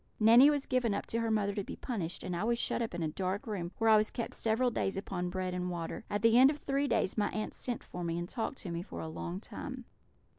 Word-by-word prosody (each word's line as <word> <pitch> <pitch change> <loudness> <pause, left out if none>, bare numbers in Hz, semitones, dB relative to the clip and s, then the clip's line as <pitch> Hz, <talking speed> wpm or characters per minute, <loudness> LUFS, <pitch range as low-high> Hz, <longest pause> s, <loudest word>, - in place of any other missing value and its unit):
Nanny 230 +6 +8
was 290 -2 0
given 245 -5 +1
up - - -3
to 230 - -2
her 230 0 0
mother 205 -2 +1
to 200 - -2
be - - -7
punished; 185 -9 -4
and 180 - -3
I 170 - -1
was 235 +1 +1
shut 240 - 0
up 225 -6 -3
in 175 - -2
a - - +1
dark 185 +4 -2
room, 180 -6 -3
where 225 - +1
I 220 -1 +8
was 215 0 +2
kept 235 - -4
several 230 +3 +1
days 195 -4 -1
upon 180 -2 -3
bread 185 0 -2
and 180 0 -2
water. 175 +6 -5
At 205 +1 -2
the 230 +1 +6
end 265 +1 +8
of 295 - -2
three 280 0 0
days 205 -5 +1
my 205 - +2
aunts 215 - -4
sent 245 -3 -4
for 180 - -7
me, 170 0 -1
and 175 0 -3
talked 235 +6 -3
to 180 - -5
me 170 0 -2
for 185 - -8
a - - -4
long 170 +3 -5
time. 255 +3 -7
210 Hz, 275 wpm, -32 LUFS, 180-235 Hz, -, Nanny